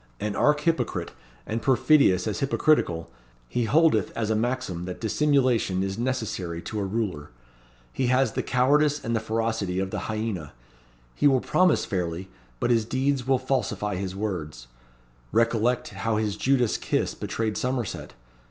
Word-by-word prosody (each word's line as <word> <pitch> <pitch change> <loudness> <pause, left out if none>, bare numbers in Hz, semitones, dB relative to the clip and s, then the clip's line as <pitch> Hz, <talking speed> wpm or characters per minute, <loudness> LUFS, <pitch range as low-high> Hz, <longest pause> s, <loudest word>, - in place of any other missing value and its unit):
An 105 0 -2
archhypocrite, 150 +5 +1 0.3
and 115 +1 -3
perfidious 130 - +4
as 110 - -2
hypocritical, 135 - +1 0.4
he 120 - -1
holdeth 150 - +3
as 110 -2 0
a - - +2
maxim 115 -7 -2
that 90 0 -6
Dissimulation 125 -6 +2
is 95 +2 -3
necessary 110 -9 -2
to 110 - -4
a - - -1
Ruler. 95 -7 -3 0.6
He 130 - 0
has 130 -1 +3
the - - -2
cowardice 145 +3 +2
and 115 +1 0
the - - +2
ferocity 110 -4 -1
of 95 0 -2
the - - -4
hyaena. 110 -9 -3 0.6
He 145 - +3
will 135 -2 +4
promise 180 +5 +2
fairly, 90 -1 -3 0.3
but 120 - +1
his 115 -2 +3
deeds 130 +2 -1
will 135 -1 +4
falsify 130 -5 -1
his 95 0 -4
words. 80 - -4 0.7
Recollect 115 +1 +1
how 110 +3 -2
his 105 -2 -1
Judas 125 0 +2
kiss - - -1
betrayed 110 -2 -3
Somerset. 125 -3 -3
115 Hz, 150 wpm, -26 LUFS, 100-130 Hz, 0.7 s, perfidious